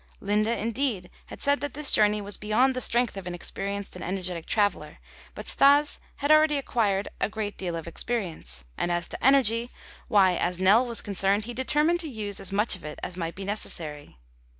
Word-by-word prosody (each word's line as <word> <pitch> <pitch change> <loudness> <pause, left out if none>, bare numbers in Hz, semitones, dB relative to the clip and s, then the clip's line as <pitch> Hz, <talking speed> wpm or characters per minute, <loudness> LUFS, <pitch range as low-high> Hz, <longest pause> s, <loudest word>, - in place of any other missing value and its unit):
Linde 210 +2 +1
indeed 225 -4 -1 0.2
had - - -9
said 285 0 +2
that 290 -2 -4
this 300 -1 +1
journey 210 0 +4
was 205 0 -4
beyond 220 +6 +2
the 255 - -2
strength 240 -2 +2
of 190 -2 -7
an 175 - -4
experienced 200 +3 -3
and 180 - -7
energetic 180 -2 -3
traveler, 205 -2 0 0.4
but - - -8
Stas 285 +2 +4 0.2
had 285 +1 0
already 310 -1 +5
acquired 210 -7 0
a - - 0
great 215 -1 -4
deal 175 -3 -4
of 165 0 -6
experience, 165 - -4
and 175 - 0
as 175 0 0
to - - -6
energy, 240 -3 +3 0.4
why, 190 -3 +4
as 180 0 -1
Nell 210 +7 +5
was 235 -1 +1
concerned, 200 +1 +1
he 240 - -6
determined 300 +7 +1
to 325 -3 -3
use 210 -5 -3
as 195 - -4
much 210 +2 +2
of 180 - -14
it 150 0 -7
as 180 - -4
might 170 -2 -4
be 195 - -6
necessary. 155 - -6
205 Hz, 195 wpm, -26 LUFS, 185-245 Hz, 0.4 s, already